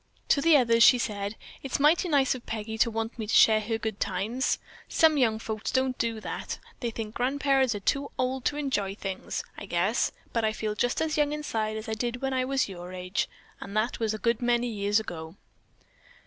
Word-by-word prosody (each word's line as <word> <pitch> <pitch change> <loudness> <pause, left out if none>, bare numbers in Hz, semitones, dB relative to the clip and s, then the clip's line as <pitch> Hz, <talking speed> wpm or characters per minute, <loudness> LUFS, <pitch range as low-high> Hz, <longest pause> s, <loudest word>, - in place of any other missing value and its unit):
To 280 - +4
the 325 0 +6
others 230 -3 +3
she 250 +2 +8
said: 205 -3 -3 0.3
"It's 270 0 -2
mighty 320 +5 +4
nice 280 -4 +3
of 255 -2 -9
Peggy 220 0 -4
to 230 - +4
want 225 +1 -4
me 220 - -3
to - - -2
share 220 -1 +7
her 225 +1 -2
good 220 -2 -4
times. 210 +7 0 0.3
Some 320 -1 +4
young 235 -6 +3
folks 220 -1 -4
don't 260 0 +1
do 230 -1 -1
that. - - -5 0.2
They 240 - -2
think 220 -1 -6
grandparents 265 -1 +2
are 205 - -5
too 280 +7 0
old 255 0 -1
to 295 - +1
enjoy 205 -10 -1
things, 195 -2 -4 0.2
I 200 - -8
guess, 190 +7 +1 0.2
but 230 - +1
I 215 0 +1
feel 215 -1 -2
just 245 +7 0
as 310 -1 -1
young 295 0 +2
inside 220 -8 -2
as 220 +1 -7
I 220 - -2
did 240 +2 -2
when 270 0 -2
I 255 -1 +1
was 270 0 +1
your 180 -2 -8
age, 180 +1 -2 0.3
and 200 - -5
that 220 +3 0
was 220 -1 0
a - - -4
good 235 +2 0
many 240 0 +2
years 205 -1 +1
ago. 165 -5 -7
230 Hz, 215 wpm, -28 LUFS, 215-260 Hz, 0.3 s, she